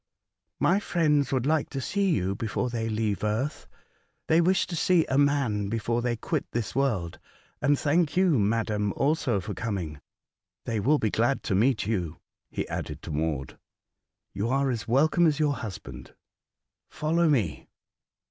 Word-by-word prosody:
'' -, -, -57 dB
My 190 Hz, +3 st, +4 dB
friends 150 Hz, -8 st, +1 dB
would 130 Hz, -2 st, 0 dB
like 155 Hz, 0 st, +1 dB
to 135 Hz, -, -4 dB
see 195 Hz, +8 st, 0 dB
you 95 Hz, -, +1 dB
before 115 Hz, +4 st, -2 dB
they 115 Hz, -1 st, -2 dB
leave 110 Hz, -2 st, -1 dB
Earth. 110 Hz, +8 st, -2 dB, 0.6 s
They 160 Hz, +1 st, +5 dB
wish 185 Hz, +2 st, +3 dB
to 175 Hz, -, -5 dB
see 170 Hz, 0 st, +3 dB
a 130 Hz, -, 0 dB
man 135 Hz, -9 st, +1 dB
before 115 Hz, +2 st, -1 dB
they 120 Hz, -1 st, 0 dB
quit 115 Hz, -, -2 dB
this 115 Hz, -3 st, -2 dB
world. 110 Hz, -11 st, -1 dB, 0.4 s
And 145 Hz, 0 st, +3 dB
thank 155 Hz, +2 st, +1 dB
you, 180 Hz, -8 st, +4 dB
madam, 105 Hz, -1 st, 0 dB
also 140 Hz, -7 st, +1 dB
for 100 Hz, +3 st, -5 dB
coming. 90 Hz, -11 st, -4 dB, 0.6 s
They 115 Hz, -2 st, -1 dB
will 145 Hz, +9 st, +3 dB
be 110 Hz, -6 st, 0 dB
glad 120 Hz, +4 st, +1 dB
to -, -, -1 dB
meet 110 Hz, +4 st, +2 dB
you," 90 Hz, -7 st, -2 dB, 0.3 s
he -, -, -3 dB
added 75 Hz, 0 st, -5 dB
to 85 Hz, -, -6 dB
Maud; 75 Hz, -3 st, -2 dB, 0.4 s
*' -, -, -59 dB
you 105 Hz, +4 st, -2 dB
are 135 Hz, +1 st, +1 dB
as 115 Hz, -3 st, -4 dB
welcome 155 Hz, +8 st, +4 dB
as 150 Hz, -2 st, +1 dB
your 150 Hz, -2 st, +2 dB
husband. 110 Hz, -8 st, -8 dB, 0.7 s
Follow 165 Hz, +2 st, +1 dB
me." 110 Hz, -, 0 dB
120 Hz, 165 wpm, -27 LUFS, 105-150 Hz, 0.7 s, They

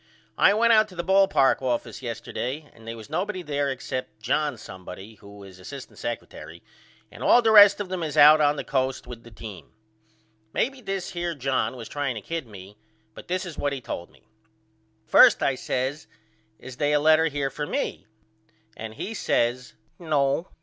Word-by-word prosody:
I 200 Hz, -, +5 dB
went 230 Hz, +1 st, +4 dB
out 215 Hz, -1 st, +5 dB
to 185 Hz, -, -15 dB
the 170 Hz, -, -3 dB
ball 195 Hz, +2 st, +4 dB
park 135 Hz, -9 st, +2 dB
office 120 Hz, -2 st, -3 dB
yesterday 130 Hz, +4 st, -5 dB
and 115 Hz, 0 st, -17 dB
they 115 Hz, -, -5 dB
was 110 Hz, -2 st, -11 dB
nobody 185 Hz, +4 st, -3 dB
there 145 Hz, -2 st, -1 dB
except 130 Hz, -3 st, -5 dB
John 145 Hz, +4 st, -1 dB
somebody 95 Hz, +1 st, -10 dB
who 100 Hz, 0 st, -13 dB
is 95 Hz, -1 st, -13 dB
asst 130 Hz, +8 st, -10 dB
secretary 85 Hz, -7 st, -7 dB, 0.5 s
and -, -, -13 dB
all 240 Hz, -, +5 dB
the 225 Hz, -, +4 dB
rest 205 Hz, -1 st, +8 dB
of 205 Hz, -, -3 dB
them 185 Hz, -1 st, -3 dB
is 155 Hz, -3 st, -4 dB
out 155 Hz, +1 st, +8 dB
on 145 Hz, 0 st, +3 dB
the -, -, -4 dB
Coast 130 Hz, -1 st, -1 dB
with 120 Hz, -2 st, -10 dB
the 120 Hz, -, -14 dB
team. 105 Hz, -3 st, -11 dB, 0.8 s
Maybe 270 Hz, 0 st, -1 dB
this 195 Hz, -4 st, -4 dB
here 175 Hz, -1 st, -3 dB
John 135 Hz, -1 st, -1 dB
was 115 Hz, -3 st, -8 dB
trying 145 Hz, -4 st, -3 dB
to 110 Hz, -, -6 dB
kid 165 Hz, +2 st, -5 dB
me 100 Hz, 0 st, -13 dB, 0.3 s
but -, -, -12 dB
this 185 Hz, +2 st, -2 dB
is 170 Hz, -4 st, -8 dB
what 145 Hz, -1 st, -1 dB
he 135 Hz, -, -4 dB
told 85 Hz, -7 st, -7 dB
me. -, -, -25 dB, 0.8 s
First -, -, +6 dB
I 135 Hz, -, +2 dB
says 130 Hz, +3 st, -3 dB, 0.5 s
Is 130 Hz, -1 st, -11 dB
they 145 Hz, 0 st, +1 dB
a 150 Hz, -, +4 dB
letter 160 Hz, +2 st, +4 dB
here 140 Hz, -3 st, -2 dB
for 150 Hz, -1 st, -5 dB
me? 100 Hz, -, -3 dB, 0.7 s
And 110 Hz, 0 st, -8 dB
he 225 Hz, -, -5 dB
says 125 Hz, -, -1 dB, 0.2 s
No. 150 Hz, 0 st, 0 dB
140 Hz, 190 wpm, -25 LUFS, 120-170 Hz, 0.8 s, rest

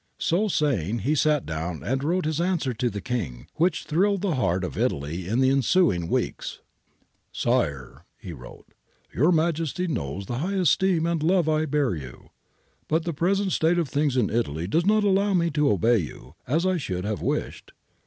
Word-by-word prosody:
So 190 Hz, +6 st, +1 dB
saying 120 Hz, -, 0 dB
he 145 Hz, -, +2 dB
sat 150 Hz, -1 st, +2 dB
down 80 Hz, +1 st, -4 dB
and 135 Hz, +2 st, -1 dB
wrote 175 Hz, +4 st, 0 dB
his 155 Hz, +1 st, -1 dB
answer 170 Hz, -8 st, 0 dB
to 120 Hz, +2 st, -1 dB
the 100 Hz, -2 st, -6 dB
King, 90 Hz, -, -4 dB
which 175 Hz, +3 st, +1 dB
thrilled 195 Hz, +4 st, +1 dB
the 190 Hz, -5 st, +1 dB
heart 95 Hz, -, 0 dB
of 90 Hz, -, -4 dB
Italy 80 Hz, +6 st, -2 dB
in 115 Hz, +6 st, +1 dB
the 130 Hz, 0 st, +4 dB
ensuing 135 Hz, -, +2 dB
weeks. -, -, -2 dB, 0.4 s
' -, -, -43 dB
Sire,' 70 Hz, -4 st, -1 dB
he 90 Hz, -, -8 dB
wrote, -, -, -12 dB, 0.3 s
' -, -, -36 dB
Your 155 Hz, +8 st, +4 dB
Majesty 165 Hz, +1 st, 0 dB
knows 95 Hz, -, -3 dB
the 120 Hz, +5 st, -4 dB
high 190 Hz, +7 st, -2 dB
esteem 185 Hz, -1 st, +2 dB
and 170 Hz, -2 st, 0 dB
love 175 Hz, +1 st, +2 dB
I 155 Hz, 0 st, +2 dB
bear 145 Hz, -5 st, +1 dB
you. 65 Hz, -7 st, -9 dB, 0.6 s
But 160 Hz, +1 st, 0 dB
the 170 Hz, -, -2 dB
present 190 Hz, +5 st, 0 dB
state 165 Hz, +1 st, +2 dB
of 165 Hz, -5 st, 0 dB
things 145 Hz, -2 st, 0 dB
in 120 Hz, -5 st, +1 dB
Italy 85 Hz, -9 st, -1 dB
does 165 Hz, -, 0 dB
not 215 Hz, 0 st, +4 dB
allow 200 Hz, 0 st, +2 dB
me 170 Hz, -1 st, +1 dB
to 150 Hz, -1 st, +2 dB
obey 110 Hz, +4 st, +3 dB
you, 70 Hz, -4 st, -8 dB
as 160 Hz, +8 st, +1 dB
I 185 Hz, -1 st, +2 dB
should 95 Hz, -, -4 dB
have 105 Hz, -1 st, -3 dB
wished. -, -, -3 dB
145 Hz, 195 wpm, -25 LUFS, -, 0.6 s, the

